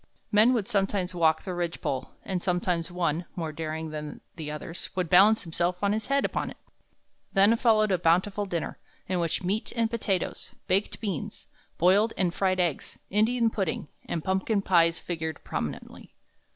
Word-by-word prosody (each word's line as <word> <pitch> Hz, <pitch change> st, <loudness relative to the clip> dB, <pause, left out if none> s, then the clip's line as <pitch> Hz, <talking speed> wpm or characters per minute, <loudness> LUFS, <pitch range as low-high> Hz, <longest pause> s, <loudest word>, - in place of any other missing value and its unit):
Men 215 Hz, +3 st, +6 dB
would 220 Hz, -5 st, 0 dB
sometimes 195 Hz, -4 st, 0 dB
walk 160 Hz, -2 st, +2 dB
the 185 Hz, -, -4 dB
ridge 175 Hz, -1 st, -2 dB
pole, 130 Hz, -1 st, -3 dB, 0.2 s
and 185 Hz, -2 st, -2 dB
sometimes 180 Hz, -2 st, 0 dB
one, 175 Hz, -1 st, -1 dB
more 165 Hz, -3 st, -3 dB
daring 160 Hz, 0 st, -4 dB
than 150 Hz, -1 st, -6 dB, 0.2 s
the 155 Hz, -3 st, -6 dB
others, 150 Hz, +3 st, -7 dB
would 180 Hz, -3 st, -1 dB
balance 200 Hz, +4 st, +6 dB
himself 175 Hz, +1 st, -1 dB
on 200 Hz, 0 st, +3 dB
his 220 Hz, +1 st, -3 dB
head 275 Hz, 0 st, +2 dB
upon -, -, -2 dB
it. -, -, -11 dB, 0.8 s
"Then 200 Hz, +3 st, +5 dB
followed 220 Hz, -3 st, +3 dB
a 185 Hz, -, +2 dB
bountiful 185 Hz, +5 st, +2 dB
dinner, 170 Hz, -4 st, -3 dB, 0.3 s
in 185 Hz, -1 st, 0 dB
which 170 Hz, +1 st, -1 dB
meat 200 Hz, +5 st, -1 dB
and 230 Hz, -1 st, +1 dB
potatoes, 200 Hz, -6 st, -2 dB
baked 195 Hz, +3 st, 0 dB
beans, 195 Hz, -9 st, -4 dB, 0.3 s
boiled 200 Hz, +6 st, +4 dB
and 180 Hz, -3 st, +1 dB
fried 185 Hz, -1 st, +1 dB
eggs, 170 Hz, -5 st, -1 dB
Indian 225 Hz, +3 st, +3 dB
pudding, 185 Hz, -8 st, -2 dB, 0.2 s
and 165 Hz, -, -3 dB
pumpkin 190 Hz, +2 st, 0 dB
pies 165 Hz, -3 st, +4 dB
figured 160 Hz, -1 st, -4 dB
prominently. -, -, -5 dB
180 Hz, 165 wpm, -27 LUFS, 165-205 Hz, 0.8 s, Men